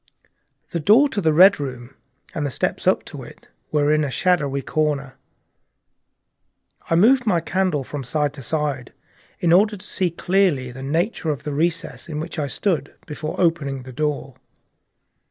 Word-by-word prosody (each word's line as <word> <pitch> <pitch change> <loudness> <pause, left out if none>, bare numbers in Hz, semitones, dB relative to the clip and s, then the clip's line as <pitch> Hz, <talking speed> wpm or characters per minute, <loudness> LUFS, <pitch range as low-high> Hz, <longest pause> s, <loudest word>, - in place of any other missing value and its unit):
The 170 - -2
door 220 - +5
of 205 - 0
the 160 -3 +3
Red 185 +5 +6
Room 130 -2 -6 0.4
and 150 - -3
the 145 - -1
steps - - -2
up - - +2
to - - -9
it - - -14 0.2
were 150 0 +2
in 155 0 +2
a 145 - -1
shadowy 145 -4 0
corner. 145 -4 -1 1.8
I 165 - +3
moved 240 +7 +4
my 180 -5 +3
candle 180 -3 -1
from 140 +1 -6
side 145 +3 -1
to 145 - -9
side 145 -2 -2 0.5
in 170 -1 +3
order 210 +3 +4
to 185 - -9
see 185 -2 0
clearly 170 -7 +1
the 130 +2 -10
nature 160 +5 -1
of 145 -3 -3
the 150 - -4
recess 165 +3 -2
in 150 -1 -4
which 160 0 -5
I 145 - -1
stood, 155 -3 -2
before 155 +1 -6
opening 145 -7 0
the 130 0 -10
door. 145 -1 -2
155 Hz, 170 wpm, -22 LUFS, 140-175 Hz, 1.8 s, Red